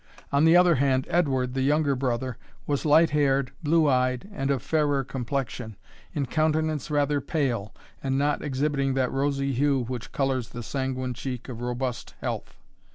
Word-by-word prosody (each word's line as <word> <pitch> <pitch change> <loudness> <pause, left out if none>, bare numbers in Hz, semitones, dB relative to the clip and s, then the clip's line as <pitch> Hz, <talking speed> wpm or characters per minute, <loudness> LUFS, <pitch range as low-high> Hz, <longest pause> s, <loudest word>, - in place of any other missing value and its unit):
On 140 +2 +4
the 165 +2 +7
other 180 -1 +6
hand, 130 -1 +2
Edward, 130 -7 +1
the 135 - -1
younger 145 +1 +2
brother, 125 -1 -2 0.3
was 145 +2 -1
light 160 +2 +5
haired, 140 -3 +2
blue 160 0 +3
eyed, 130 +3 +1
and 135 -8 -2
of 135 -3 0
fairer 145 -3 +1
complexion, 125 -3 -4 0.4
in 145 -2 0
countenance 155 0 0
rather 145 -1 +1
pale, 125 -11 -1 0.3
and 135 -1 0
not 145 +1 +1
exhibiting 140 -1 0
that 130 -2 +1
rosy 140 0 0
hue 135 0 +2
which 120 0 -6
colours 135 -3 -1
the 120 - -7
sanguine 130 0 -2
cheek 125 +1 -6
of 120 -2 -7
robust 125 0 -3
health. - - -4
135 Hz, 160 wpm, -26 LUFS, 130-145 Hz, 0.4 s, the